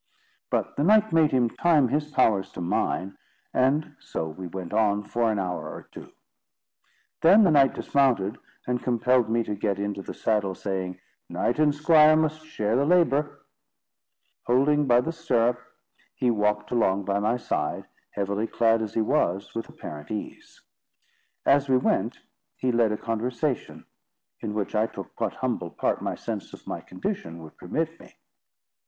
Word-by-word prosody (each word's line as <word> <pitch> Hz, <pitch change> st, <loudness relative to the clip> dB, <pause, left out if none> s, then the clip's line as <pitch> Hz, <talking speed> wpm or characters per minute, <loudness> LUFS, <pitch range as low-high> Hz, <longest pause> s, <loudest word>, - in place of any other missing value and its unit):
But -, -, -2 dB
the 145 Hz, -, +1 dB
knight 215 Hz, +2 st, +4 dB
made 160 Hz, -2 st, +5 dB
him 125 Hz, -3 st, +2 dB
time 150 Hz, 0 st, +2 dB
his 150 Hz, +2 st, -1 dB
powers 105 Hz, -9 st, +2 dB
to -, -, -8 dB
mine, 90 Hz, +2 st, -1 dB, 0.3 s
and 140 Hz, +4 st, +1 dB
so 80 Hz, -, -4 dB
we 90 Hz, +4 st, -7 dB
went 90 Hz, 0 st, -7 dB
on 105 Hz, -2 st, +2 dB
for 115 Hz, +2 st, 0 dB
an 105 Hz, -, -1 dB
hour 90 Hz, -2 st, -3 dB
or -, -, -10 dB
two. -, -, -11 dB, 1.1 s
Then 195 Hz, +7 st, +7 dB
the 180 Hz, -, +4 dB
knight 140 Hz, -3 st, +4 dB
dismounted, 125 Hz, -8 st, +1 dB, 0.3 s
and 125 Hz, -1 st, -1 dB
compelled 125 Hz, -1 st, +2 dB
me 115 Hz, +1 st, +1 dB
to 105 Hz, -, -4 dB
get 100 Hz, -1 st, -1 dB
into 100 Hz, 0 st, -3 dB
the -, -, -8 dB
saddle, 100 Hz, -4 st, 0 dB
saying: 95 Hz, -2 st, -4 dB, 0.3 s
"Knight 120 Hz, -, -1 dB
and 150 Hz, -2 st, +3 dB
squire 155 Hz, 0 st, +6 dB
must 155 Hz, 0 st, 0 dB
share 110 Hz, -5 st, -1 dB
the 135 Hz, -, +3 dB
labour." 150 Hz, -3 st, +2 dB, 1.0 s
Holding 140 Hz, +4 st, +3 dB
by 120 Hz, -1 st, +5 dB
the 165 Hz, -, -3 dB
stirrup, 125 Hz, -7 st, +1 dB, 0.6 s
he 125 Hz, -2 st, +1 dB
walked 105 Hz, -1 st, 0 dB
along 100 Hz, -5 st, +1 dB
by 100 Hz, 0 st, 0 dB
my 110 Hz, +4 st, +1 dB
side, 125 Hz, -, -2 dB, 0.3 s
heavily 100 Hz, +2 st, -1 dB
clad 115 Hz, -1 st, +2 dB
as 110 Hz, -2 st, -5 dB
he 115 Hz, -, +2 dB
was, 95 Hz, -3 st, 0 dB
with 115 Hz, -, -5 dB
apparent 75 Hz, 0 st, -9 dB
ease. 105 Hz, -1 st, -7 dB, 0.8 s
As 140 Hz, 0 st, +3 dB
we 130 Hz, -, +5 dB
went, 125 Hz, -, 0 dB, 0.4 s
he 130 Hz, -, 0 dB
led 115 Hz, -2 st, +2 dB
a 105 Hz, -, -1 dB
conversation, 120 Hz, +5 st, -3 dB, 0.5 s
in 105 Hz, -1 st, -5 dB
which 105 Hz, -2 st, -2 dB
I 110 Hz, +1 st, +2 dB
took -, -, -10 dB
what -, -, -1 dB
humble -, -, -2 dB
part -, -, -1 dB
my -, -, -2 dB
sense -, -, -6 dB
of -, -, -12 dB
my -, -, -5 dB
condition 85 Hz, 0 st, -5 dB
would 80 Hz, -, -13 dB
permit 165 Hz, -, -3 dB
me. -, -, -17 dB
115 Hz, 165 wpm, -26 LUFS, 100-145 Hz, 1.1 s, Then